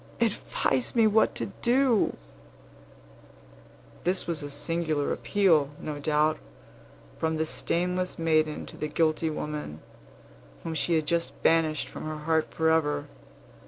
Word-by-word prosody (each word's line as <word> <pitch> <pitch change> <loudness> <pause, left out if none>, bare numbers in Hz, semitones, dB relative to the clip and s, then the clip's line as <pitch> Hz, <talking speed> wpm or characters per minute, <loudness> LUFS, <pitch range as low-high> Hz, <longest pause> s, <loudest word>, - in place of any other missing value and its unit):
Advise 195 - 0
me 230 -2 +5
what 215 +1 +3
to 115 - -3 0.2
do." 245 -2 +3 1.9
This 180 +2 +1
was 165 -3 -2
a 145 - -6
singular 155 0 -1
appeal, 170 -9 +2
no 150 -1 -5
doubt, 150 +1 +1 0.8
from 160 0 0
the 160 - 0
stainless 180 +3 -1
maiden 155 -2 +1
to - - -12
the 150 - -2
guilty 160 +1 +1
woman, 150 - -5 0.8
whom 165 - -4
she 165 +2 +1
had 155 -1 +1
just 170 +2 -1
banished 160 -2 +2
from - - -8
her 155 0 -4
heart 160 +1 0
forever. 150 -3 +1
160 Hz, 125 wpm, -27 LUFS, 150-170 Hz, 1.9 s, me